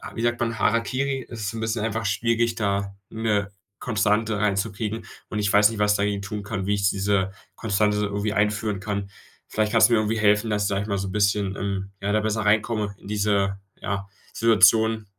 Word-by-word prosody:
wie 115 - -4
sagt 120 0 +1
man, 115 -2 -1
Harakiri. 130 +5 0
Es 115 -2 -7
ist 100 - -2
so 115 - -7
'n - - -4
bisschen 110 -1 -1
einfach 115 0 -2
schwierig, 115 +3 +1
da 100 -2 -1
'ne 105 -3 -1 0.3
Konstante 110 -1 +1
reinzukriegen, 105 +2 -1 0.2
und 110 - -4
ich 100 -1 +1
weiß 105 +1 +6
nicht, 110 -2 -6
was 105 0 +3
ich - - +1
dagegen 100 0 0
tun 105 0 -5
kann, 100 -2 -4
wie 105 - +2
ich 100 -1 +2
diese 95 -1 0 0.2
Konstante 105 -1 +1
irgendwie 105 +1 -1
einführen 105 -1 0
kann. 100 0 -4 0.4
Vielleicht 110 -1 0
kannst 115 0 +6
du - - +2
mir 115 - +4
irgendwie 110 +1 0
helfen, 105 +1 +3
dass 105 -1 0
ich, - - +1
sage 100 0 0
ich - - -7
mal, 100 -2 -1
so 95 0 -3
bisschen, 100 -1 +1
ähm, 100 0 -3
ja, 100 +1 -1
da 110 - +3
besser 110 0 -1
reinkomme 105 -1 +1
in - - -13
diese, 100 -2 0 0.2
ja, 100 -1 -3 0.3
Situation. 110 0 +4
105 Hz, 210 wpm, -24 LUFS, 100-110 Hz, 0.4 s, weiß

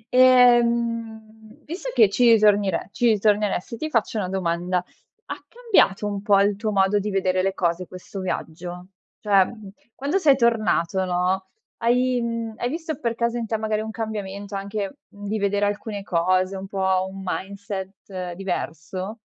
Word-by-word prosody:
Ehm, 235 -3 +3
visto 365 +10 -5
che 225 - +6
ci 235 +4 +4
ritornire 205 -5 +3
ci 240 - +1
ritorneresti, 210 -1 +1
ti 310 - -3
faccio 230 -4 0
una 185 -3 -2
domanda: 180 -1 -1
ha 180 - -9
cambiato 450 - +2
un 205 -1 -3
po', 200 -1 +4
il 200 0 +2
tuo 215 +1 -2
modo 195 0 +3
di 205 +1 -3
vedere 185 -2 +1
le 190 +1 -1
cose 175 0 -1
questo 185 +2 -9
viaggio? 180 0 -5 0.3
Cioè, 200 -3 +4
mhmm, 215 -2 -10 0.3
quando 285 +8 0
sei 290 -7 +5
tornato, 215 -7 +1
no, 185 +1 0 0.3
hai, 250 +1 +2
mhmm, 230 -1 -3
hai 245 - -2
visto 315 0 -4
per 235 -1 -1
caso 235 +1 0
in 230 -1 -3
te, 220 - -1
magari, 215 0 -1
un 220 - -5
cambiamento 205 -3 -5
anche, 200 +4 -4
mhmm, 205 0 -12
di 215 +2 -2
vedere 200 0 +1
alcune 205 0 -3
cose, 185 +1 +1
un 190 +1 -7
po' 190 -1 0
un 195 - -9
mindset 190 -1 -5
diverso? 185 +2 -4
205 Hz, 160 wpm, -23 LUFS, 190-230 Hz, 0.3 s, che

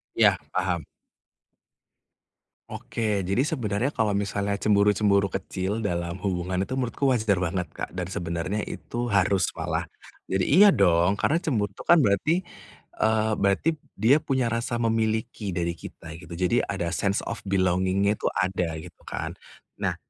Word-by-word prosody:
Iya, - - +5 0.2
paham. 90 -3 -1 1.8
Oke, 105 -4 -2
jadi 100 +7 -1
sebenarnya 120 - -1
kalau 110 -2 +1
misalnya 100 0 -1
cemburu-cemburu 100 -2 +3
kecil 95 +4 -3
dalam 85 -3 -2
hubungan 90 -1 -2
itu 130 - -4
menurutku 130 +2 -1
wajar 105 -6 +1
banget 90 0 -1
Kak. - - -5
Dan 90 0 -4
sebenarnya 85 +4 -2
itu 120 +1 -4
harus 100 -3 +2
malah, - - -2 0.4
jadi 95 0 0
iya 200 +7 +7
dong, 85 +3 +4
karena 155 +10 +1
cemburu 105 - 0
itu - - -10
kan 170 - +7
berarti, 150 - +2 0.6
eee, 110 0 +2
berarti 100 +10 +2 0.3
dia 120 +8 +5
punya 130 -5 0
rasa 115 +1 -1
memiliki 110 -2 0
dari 85 -1 -1
kita 80 0 -10
gitu, 85 0 -10
jadi 90 +7 +2
ada 85 -4 -2
sense 100 +4 0
of - - -5
belonging-nya 95 +1 +2
itu - - -1
ada, 90 -3 0
gitu - - -14
kan. - - -4 0.5
Nah, - - 0
100 Hz, 145 wpm, -26 LUFS, 90-110 Hz, 1.8 s, iya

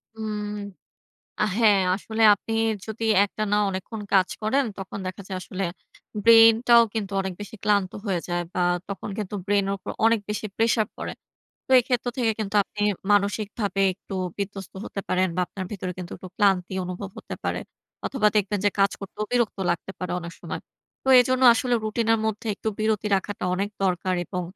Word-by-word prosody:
হুম। 215 -1 -4 1.0
আ - - +4
হ্যাঁ, 210 -4 +5 0.2
আসলে 220 +2 -4
আপনি 225 - -6 0.3
যদি 220 +1 -5 0.2
একটানা 210 0 -1
অনেকক্ষণ 195 +3 -5
কাজ 190 -2 +4
করেন 265 +6 +2
তখন 195 0 -6
দেখা 185 +2 -5
যায় 190 -2 -4
আসলে 185 +2 -4 0.6
ব্রেইনটাও 230 +1 +7
কিন্তু 205 -3 -3
অনেক 190 -1 -4
বেশি 205 +2 -8
ক্লান্ত 205 -3 +2
হয়ে 185 -4 0
যায়। 175 -1 -1
বা 180 - 0 0.3
তখন 200 0 -5
কিন্তু 210 -1 -4
ব্রেইনের 200 -1 +1
উপর - - -6
অনেক 230 -1 +4
বেশি 210 +1 -2
প্রেশার 225 -1 +2
পড়ে। - - -5 0.5
তো - - -16
এই 250 - +4
ক্ষেত্র 245 -1 0
থেকে 235 -3 +2
কিন্তু 210 -1 -4
আপনি 210 - -9 0.3
মানসিকভাবে 205 0 0
একটু 195 - -9 0.2
বিধ্বস্ত 200 -2 -5
হতে 195 - -5
পারেন 185 0 +2
বা - - +2
আপনার 190 - -6
ভেতরে 185 -3 -4
কিন্তু 175 -1 -7
একটু 185 - -10
ক্লান্তি 190 -3 +2
অনুভব 185 +2 -6
হতে - - -7
পারে। - - -1 0.5
অথবা 225 -6 +2
দেখবেন 205 0 +1
যে 205 - +4
কাজ 200 0 +4
করতেও 205 +2 -5
বিরক্ত 240 -5 +1
লাগতে 175 +2 -3
পারে 180 -1 -3
অনেক 170 +1 -7
সময়। - - -5 0.4
তো - - -3
এজন্য 255 +1 +1
আসলে 245 +1 0
রুটিনের 225 +1 +1
মধ্যে 220 +1 -3
একটু 220 - -4
বিরতি 215 -1 0
রাখাটা 190 0 -4
অনেক 200 +2 -1 0.2
দরকার 185 0 0
এবং 180 0 -4
205 Hz, 175 wpm, -25 LUFS, 190-220 Hz, 1.0 s, ব্রেইনটাও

